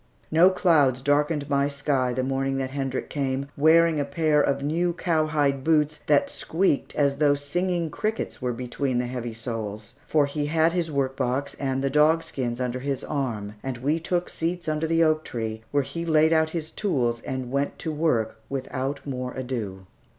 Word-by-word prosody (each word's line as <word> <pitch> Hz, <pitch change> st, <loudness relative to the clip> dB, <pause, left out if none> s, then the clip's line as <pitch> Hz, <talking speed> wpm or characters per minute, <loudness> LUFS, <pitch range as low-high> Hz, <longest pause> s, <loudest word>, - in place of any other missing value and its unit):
No 170 Hz, +4 st, +7 dB
clouds 155 Hz, -9 st, +3 dB
darkened 145 Hz, +1 st, +1 dB
my 140 Hz, -1 st, +2 dB
sky 140 Hz, -3 st, 0 dB
the 130 Hz, +1 st, -1 dB
morning 135 Hz, 0 st, -1 dB
that 130 Hz, -1 st, -2 dB
Hendrik 135 Hz, -2 st, -3 dB
came, 140 Hz, -1 st, -2 dB
wearing 160 Hz, +1 st, +5 dB
a -, -, +2 dB
pair 150 Hz, +1 st, +2 dB
of 140 Hz, -1 st, 0 dB
new 170 Hz, +4 st, +1 dB
cowhide 155 Hz, -5 st, +1 dB
boots 150 Hz, -1 st, +2 dB
then 145 Hz, -1 st, +5 dB
squeaked 165 Hz, -4 st, -1 dB
as 140 Hz, -1 st, +2 dB
though 145 Hz, -1 st, +4 dB
singing 170 Hz, +3 st, -1 dB
crickets 215 Hz, -3 st, -3 dB
were 125 Hz, -1 st, 0 dB
between 125 Hz, +2 st, -2 dB
the 125 Hz, -, 0 dB
heavy 120 Hz, -1 st, -4 dB
soles; 110 Hz, -2 st, -5 dB
for 150 Hz, -2 st, +3 dB
he 145 Hz, +1 st, -2 dB
had 160 Hz, +2 st, +3 dB
his 170 Hz, -2 st, -1 dB
workbox 135 Hz, -1 st, -1 dB
and 135 Hz, -1 st, -1 dB
the 135 Hz, -, 0 dB
dogskins 150 Hz, -5 st, +2 dB
under 125 Hz, 0 st, -2 dB
his 135 Hz, 0 st, -3 dB
arm, 115 Hz, -8 st, -3 dB
and 130 Hz, -2 st, -4 dB
we 145 Hz, +6 st, 0 dB
took 175 Hz, +2 st, -1 dB
seats 170 Hz, +1 st, -3 dB
under 155 Hz, +1 st, 0 dB
the 165 Hz, +1 st, +3 dB
oak 155 Hz, -1 st, +2 dB
tree, 110 Hz, -2 st, -4 dB
where 145 Hz, -1 st, +1 dB
he 170 Hz, +5 st, -5 dB
laid 160 Hz, -1 st, +4 dB
out 160 Hz, 0 st, +3 dB
his 160 Hz, -1 st, -5 dB
tools 120 Hz, -, 0 dB
and 130 Hz, -2 st, -4 dB
went 140 Hz, +1 st, -1 dB
to 160 Hz, -, -3 dB
work 125 Hz, -9 st, 0 dB
without 135 Hz, +1 st, -3 dB
more 125 Hz, -2 st, -4 dB
ado. 115 Hz, -8 st, -4 dB
140 Hz, 180 wpm, -25 LUFS, 130-160 Hz, -, No